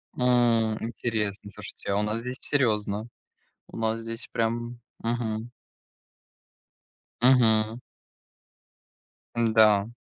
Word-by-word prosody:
М. 120 -3 +3
Интересно. 110 -3 -3
Слушайте, - - -7
а 100 - +1
у - - +2
нас 105 +2 -1
здесь 125 +2 -4
серьезно, 110 -5 0 0.6
у - - -10
нас 115 0 0
здесь 115 +1 -6
прям. 120 +1 -2 0.2
Мгм. 115 -1 -2 1.7
Мгм. 115 -3 +4 1.6
Н-да. 110 -3 +4
115 Hz, 90 wpm, -27 LUFS, 110-120 Hz, 1.7 s, Мгм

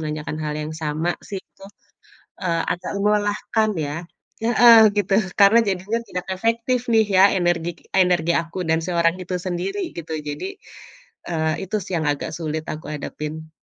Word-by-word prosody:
menanyakan 155 -1 -4
hal 150 - -2
yang 150 +1 -4
sama 160 +2 -1
sih 195 - -6
itu, 195 - -18 0.8
eee, 170 -2 0
agak 175 - -4
melelahkan 210 +1 +1 0.2
ya. 145 +3 -4 0.5
Heeh, 230 -2 +7
gitu 195 -1 +1 0.3
karena 200 +3 +7
jadinya 200 +4 -1
tidak 180 0 -5
efektif 230 +5 0
nih 220 -1 +5
ya 190 - +8
energi 175 -1 0 0.2
energi 180 -3 +3
aku 170 +2 -2
dan 160 0 +2
si 180 - -3
orang 170 0 +3
itu 180 0 -4
sendiri 185 +3 -3 0.2
gitu 165 -1 -5 0.2
jadi, 145 - -4 0.8
eee, 160 -2 0
itu 200 +3 -4
sih 185 - -8
yang 155 - -2
agak 145 +2 -4
sulit 155 -1 -3
aku 155 - -9
hadapin. 155 +2 -6
175 Hz, 160 wpm, -22 LUFS, 160-205 Hz, 0.8 s, ya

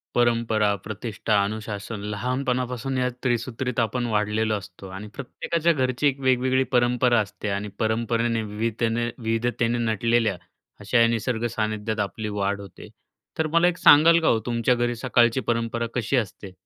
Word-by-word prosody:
परंपरा, 115 -3 +2
प्रतिष्ठा, 110 +2 -3
अनुशासन 105 0 -5
लहानपणापासून 125 +2 -2
या 125 0 +1 0.2
त्रिसूत्रीत 120 0 -1
आपण 120 +2 0
वाढलेलो 110 0 0
असतो 95 -1 -11
आणि 105 +2 -7
प्रत्येकाच्या 165 +5 -1
घरची 130 0 +1
एक 135 -1 0
वेगवेगळी 130 0 +2
परंपरा 125 -1 +3
असते. 105 0 -4
आणि 100 +1 -2
परंपरेने 115 +1 0
विवितेने 115 +2 -1
विविधतेने 115 +1 0
नटलेल्या 115 -2 +1 0.4
अशा 105 +4 +1
या 115 - +6
निसर्ग 115 0 -1
सानिध्यात 110 0 -2
आपली 105 +2 -3
वाढ 100 +1 0
होते. 100 - -12 0.5
तर 160 - +1
मला 170 +3 +3
एक 180 0 0
सांगाल 165 +2 +7
का 160 - +1
हो, 115 - +3
तुमच्या 120 +1 +1
घरी 120 0 0
सकाळची 120 0 +2
परंपरा 115 0 -1
कशी 120 +2 0
असते? 100 -3 -4
115 Hz, 145 wpm, -24 LUFS, 110-125 Hz, 0.5 s, सांगाल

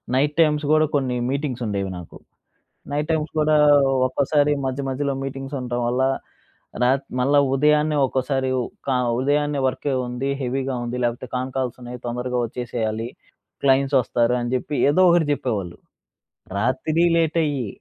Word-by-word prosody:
Night 145 +2 +1
times 150 -2 +3
గూడా 155 0 +5
కొన్ని 130 -3 0
meetings 135 -3 -2
ఉండేవి 100 -2 -2
నాకు. 90 - -10 0.7
నైట్ 150 +2 -2
టైమ్స్ 155 -1 0
కూడా 155 0 +3 0.5
ఒక్కోసారి 145 +2 +2
మధ్య 130 +1 -2
మధ్యలో 140 +1 -1
మీటింగ్స్ 135 +1 -6
ఉండటం 120 -1 -3
వల్ల 125 +2 +1 0.8
రాత్ 135 +2 +2
మళ్ళ 140 +3 +2 0.2
ఉదయాన్నే 150 +1 +3
ఒక్కోసారి 130 0 -1 0.4
క - - 0 0.3
ఉదయాన్నే 145 +1 +1
వర్క్ 130 - -4 0.2
ఉంది, 125 +3 -3
హెవీగా 130 +1 -2
ఉంది 120 +1 -4
లేకపోతే 120 +2 -2
కాన్ 130 +1 -3
కాల్స్ 130 -3 -2
ఉన్నాయి 125 0 -7
తొందరగా 125 +1 -2
ఒచ్చేసేయాలి. 115 -2 -3 0.6
క్లయింట్స్ 135 0 +3
ఒస్తారు 120 +2 +1
అని 120 0 -3
జెప్పి 135 +4 -3 0.2
ఏదో 185 +5 +4
ఒకటి 170 -3 +3
జెప్పేవాళ్ళు. 105 -11 -2 0.8
రాత్రి 130 +9 +1
లేటయ్యి, 155 -6 0
135 Hz, 140 wpm, -22 LUFS, 125-145 Hz, 0.8 s, గూడా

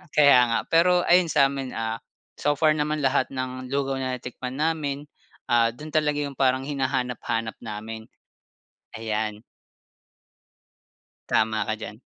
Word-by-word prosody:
Kaya 140 -4 +7
nga. 115 - +1
Pero 175 +2 +4
ayun 175 0 +5
sa'min, 135 -3 +1
ah, 115 0 -2 0.4
so 145 0 +2
far 155 +2 +4
naman 150 -1 -1
lahat 135 0 +2
ng 130 -1 -4
lugaw 135 0 -1
na 130 -1 -2
natikman 125 +1 -7
namin, 155 -3 0 0.5
ah, 115 -1 +3
do'n 150 +4 -9
talaga 150 -1 +1
'yong 140 -2 -7
parang 130 -1 +3
hinahanap-hanap 125 -5 -2
namin. 110 +1 -7 0.9
Ayan. 110 -1 -3 1.9
Tama 110 -1 +2
ka 110 - 0
diyan. 105 0 -8
130 Hz, 130 wpm, -25 LUFS, 115-145 Hz, 1.9 s, Kaya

